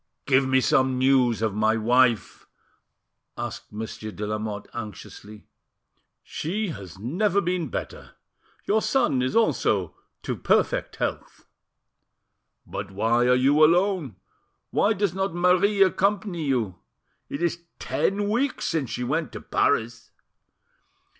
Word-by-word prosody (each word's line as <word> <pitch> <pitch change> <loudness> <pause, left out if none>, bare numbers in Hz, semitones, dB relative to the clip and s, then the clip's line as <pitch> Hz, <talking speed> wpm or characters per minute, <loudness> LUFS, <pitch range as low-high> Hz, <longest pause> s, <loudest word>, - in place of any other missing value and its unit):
"Give 135 -1 +3
me 130 0 +3
some 130 0 +2
news 130 -3 +3
of 110 -3 0
my 110 +2 +2
wife," 120 0 +2 0.9
asked - - -6
Monsieur 110 0 -6
de 105 0 -5
Lamotte 105 -1 -4
anxiously. 105 -1 -9 0.8
"She 200 +6 -3
has 95 - -8
never 180 - 0
been 180 -3 -1
better. - - -6 0.5
Your 215 +2 +2
son 175 - +1
is 130 - -1
also 110 - +1 0.3
to - - -2
perfect - - 0
health." - - -4 1.2
"But 100 0 -6
why 115 +5 +1
are 125 - +5
you 140 +4 +4
alone? 175 - +2 0.6
Why 215 - +2
does 200 -3 -1
not 190 -2 -2
Marie 180 +3 +4
accompany 190 -3 0
you? 115 -10 -1 0.5
It 140 - -4
is 170 0 -1 0.2
ten 205 +1 -1
weeks 255 +6 -1
since 155 -7 -1
she 125 - -3
went 155 +6 -1
to - - -6
Paris." 115 -3 0
130 Hz, 125 wpm, -25 LUFS, 110-180 Hz, 1.2 s, are